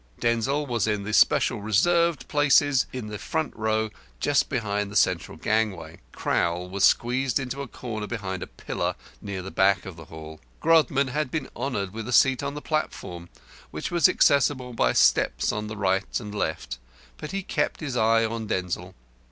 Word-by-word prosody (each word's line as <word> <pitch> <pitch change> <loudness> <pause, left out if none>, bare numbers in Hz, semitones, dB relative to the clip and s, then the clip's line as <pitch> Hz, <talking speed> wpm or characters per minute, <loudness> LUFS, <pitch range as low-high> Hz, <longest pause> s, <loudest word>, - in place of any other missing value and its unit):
Denzil 120 +5 +1
was 120 -6 -1
in 105 -2 0
the 105 +2 -4
special 115 +1 +3
reserved 170 - +2
places 145 -2 +3
in 130 -3 -5
the 105 -1 -6
front 160 +7 -3
row 110 0 0 0.3
just 140 - +2
by 105 -5 -1
the 100 0 -9
central 90 -6 +1
gangway; 95 -5 -1
Crowl 85 +1 -1
was 100 0 -1
squeezed 125 +4 +3
into 135 +1 -4
a 140 - -5
corner 110 -4 -6
behind 95 -5 -4
a - - -5
pillar - - -3 0.3
near 95 -2 -5
the 95 - -7
back 95 -1 +2
of 95 -3 -8
the 80 - -10
hall. 80 0 -10 0.2
Grodman 150 -4 +3
had 150 +1 -1
been 155 +4 -3
honoured 100 -9 -3
with 110 0 -6
a 125 - -3
seat 135 +1 +5
on 140 0 -4
the 150 - -7
platform, 90 - -3 0.4
which 75 - -5
was 170 -4 +5
accessible 130 -2 +2
by - - +2
steps - - +3
on 105 0 -4
the 110 0 -7
right 95 -1 0
and 105 -3 -8
left, 80 -11 -3 0.4
but - - -7
he 195 0 -3
kept 150 -4 -1
his 140 -5 -4
eye 115 0 +3
on 110 -1 -4
Denzil. 90 -1 -3
110 Hz, 180 wpm, -25 LUFS, 95-135 Hz, 0.4 s, seat